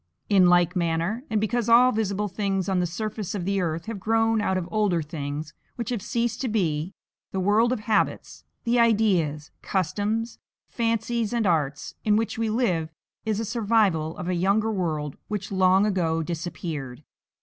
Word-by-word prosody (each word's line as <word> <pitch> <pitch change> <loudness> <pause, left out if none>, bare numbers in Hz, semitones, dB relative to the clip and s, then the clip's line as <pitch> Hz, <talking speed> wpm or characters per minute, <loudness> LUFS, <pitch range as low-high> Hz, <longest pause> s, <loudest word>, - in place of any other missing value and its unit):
In 190 -3 +6
like 175 0 +4
manner, 170 +7 -1
and 215 - +1
because 230 +2 0
all 245 +2 +7
visible 210 -2 -1
things 195 -1 -1
on 190 -2 +1
the 175 - +1
surface 210 +3 -4
of 180 -4 -3
the 195 0 0
earth 165 -1 -2
have 225 -3 -5
grown 225 +2 +2
out 190 -2 +1
of 175 -2 -3
older 205 -6 +1
things 150 0 -5 0.2
which 235 -1 -4
have 235 -5 -2
ceased 235 +2 -1
to 265 - -1
be, 180 -5 -1 0.4
the 190 - -2
world 210 +5 +3
of 250 -4 -1
habits, 215 0 -1 0.2
the 240 0 +2
ideas, 190 -10 +2
customs, 210 +5 -1 0.3
fancies, 230 -1 -1
and 235 -2 +1
arts, 150 -6 0
in 210 -1 +3
which 225 +1 -1
we 225 -1 0
live 185 -9 0 0.4
is 215 -1 0
a 225 - -2
survival 205 -8 +1
of 180 - -5
a 185 - 0
younger 200 +5 +2
world 155 -7 -2
which 205 -2 -4
long 190 +1 +4
ago 165 -5 0
disappeared. 160 -5 -5
200 Hz, 170 wpm, -25 LUFS, 170-225 Hz, 0.4 s, all